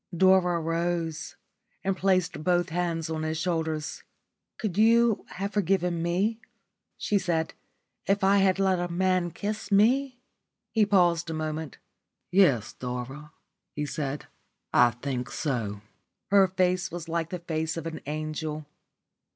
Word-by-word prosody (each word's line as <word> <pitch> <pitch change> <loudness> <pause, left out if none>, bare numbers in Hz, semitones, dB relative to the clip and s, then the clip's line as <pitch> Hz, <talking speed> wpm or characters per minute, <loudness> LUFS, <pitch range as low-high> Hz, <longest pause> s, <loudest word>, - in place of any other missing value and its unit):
Dora 185 -1 +4
rose, 165 0 -2 0.5
and 195 0 0
placed 185 -4 +1
both 175 +1 +2
hands 165 -1 -1
on 160 -1 -3
his 155 0 -2
shoulders. 160 -1 -2 0.6
"Could 210 -6 -3
you 230 +1 +4
have 200 +2 -4
forgiven 180 -3 +1
me," 190 +7 0 0.6
she 205 - +1
said, 170 -3 -1 0.5
"if 195 0 +2
I 195 +1 +5
had 195 -1 +3
let 190 -2 +2
a 175 0 -2
man 185 0 +1
kiss 210 +3 -5
me?" 250 +6 +3 0.5
He 220 -3 +3
paused 175 -4 +3
a 160 - -3
moment. 155 -1 -4 0.5
"Yes, 140 - +4
Dora," 125 +4 -6 0.4
he 150 - -2
said, 145 -1 -4 0.5
"I 120 0 +6
think 125 +1 -4
so." 110 -9 -2 0.5
Her 200 -1 +6
face 185 +1 +1
was 170 -1 -6
like 165 -1 -1
the 180 - -3
face 160 -1 -3
of 165 - -5
an 165 -1 -5
angel. 155 0 -4
175 Hz, 135 wpm, -27 LUFS, 155-190 Hz, 0.6 s, I